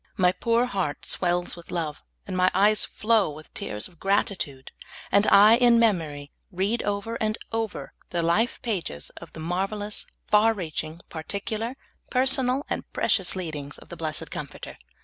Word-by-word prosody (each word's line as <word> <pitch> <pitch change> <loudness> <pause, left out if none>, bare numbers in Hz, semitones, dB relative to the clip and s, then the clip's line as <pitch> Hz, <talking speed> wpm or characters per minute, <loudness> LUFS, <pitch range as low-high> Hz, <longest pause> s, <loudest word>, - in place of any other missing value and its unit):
M}" 180 -1 +4
poor 235 +1 +3
heart 190 -11 -2
swells 175 -1 0
with 170 -1 -13
love 155 -4 -3 0.2
and 190 - -4
my 185 0 +4
eyes 205 +2 +4
flow 220 -4 +2
with 150 0 -11
tears 105 +1 -3
of 170 -3 -21
gratitude, 190 -9 -1 0.4
and 200 +1 +5
I 210 +3 +8
in 240 -1 +6
memory 160 -11 +1 0.2
read 200 +6 0
over 205 +3 -2
and 215 0 0
over 225 -2 -3 0.2
the 170 -1 -1
life 205 +9 +2
pages 180 - -3
of - - -10
the - - -9
mar\^elous, 195 +5 -3 0.2
far 220 +2 +4
reaching, 160 -2 -4
particular, 210 +8 -4 0.3
personal, 260 +1 +2
and - - -4
precious 190 -3 +1
leadings 155 -6 -4
of - - -15
the - - -7
blessed 155 -2 -3
Comforter. - - -7
195 Hz, 155 wpm, -26 LUFS, 165-220 Hz, 0.4 s, I